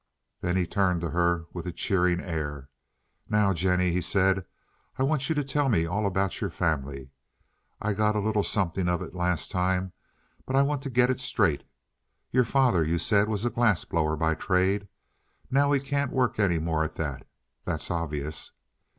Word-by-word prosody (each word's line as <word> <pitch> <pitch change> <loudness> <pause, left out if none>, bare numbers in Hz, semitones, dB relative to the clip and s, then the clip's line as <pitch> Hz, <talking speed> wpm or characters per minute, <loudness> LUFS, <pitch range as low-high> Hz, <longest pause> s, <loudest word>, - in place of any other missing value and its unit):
Then 90 +1 -1
he 90 - +2
turned 90 -1 +1
to 85 - -3
her 85 -1 +1
with 90 -1 -6
a - - -2
cheering 90 0 +1
air. 75 -6 -4 0.6
"Now, 105 -2 +3
Jennie," 90 +1 +1
he 90 +1 0
said, 95 +2 +2 0.5
"I 130 - +1
want 135 -1 0
you 160 - +1
to 145 - +1
tell 140 0 0
me 85 -8 +2
all 100 +5 0
about 95 0 -1
your - - -1
family. 70 -4 -2 0.7
I 105 0 -1
got 105 +1 +1
a - - +2
little 105 0 +1
something 95 -3 0
of 90 -1 0
it - - -9
last 90 -1 -1
time, 90 -1 0 0.5
but 130 - -1
I 135 - +5
want 145 -1 -1
to 135 - -5
get 125 0 +3
it 130 - -3
straight. 105 - +1 0.7
Your 125 0 +3
father, 120 -9 +3
you 80 +2 0
said, 100 +5 +3
was 110 +1 -1
a 120 - +1
glass 110 -7 +2
blower 80 -2 0
by 80 +1 +1
trade. 95 +4 +1 0.6
Now 140 +2 +3
he 140 - +3
can't 140 0 -1
work 125 -4 0
any 95 -5 +3
more 80 -1 0
at 80 - -4
that, 70 -5 -5 0.4
that's - - -2
obvious." 75 -3 -3
95 Hz, 185 wpm, -27 LUFS, 85-110 Hz, 0.7 s, I